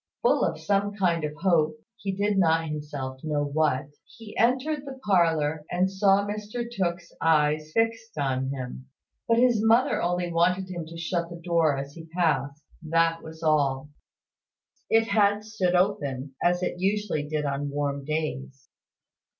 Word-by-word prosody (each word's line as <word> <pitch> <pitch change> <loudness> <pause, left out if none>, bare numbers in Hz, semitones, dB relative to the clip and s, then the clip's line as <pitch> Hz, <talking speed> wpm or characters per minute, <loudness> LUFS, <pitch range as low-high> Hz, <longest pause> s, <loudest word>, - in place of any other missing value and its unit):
Full 485 - +3
of - - -1
some 205 0 0
kind 175 -5 +1
of 150 0 -3
hope 165 +2 +2 0.2
(he 205 -5 -4
did 205 +2 0
not 165 -2 +3
himself 145 -3 -5
know 150 -2 0
what), 145 -2 0 0.3
he 225 -3 -11
entered 265 +5 +1
the 270 -2 -9
parlour, 160 -6 +2
and 185 +2 +1
saw 195 +1 +3
Mr 210 +3 -4
Tooke's 175 -5 -2
eyes 155 -1 +2
fixed 225 0 -1
on 135 -2 0
him. 130 -1 -6 0.4
But 230 - +3
his 240 -3 +4
mother 230 +3 +3
only 175 0 -1
wanted 180 +3 +2
him 170 -3 -5
to 165 +1 -9
shut 170 0 -2
the 175 - -7
door 165 -4 +2
as 140 +1 -5
he 165 0 -11
passed; 160 -4 0 0.2
that 165 +1 +1
was 160 +1 -11
all. 145 -2 +1 1.0
It 225 0 +4
had 205 -1 +3
stood 195 -5 0
open, 145 -8 0
as 175 +1 +2
it 180 - -2
usually 195 -3 0
did 150 0 -2
on 140 +1 -2
warm 140 -1 -2
days. 150 - -4
170 Hz, 160 wpm, -26 LUFS, 150-200 Hz, 1.0 s, his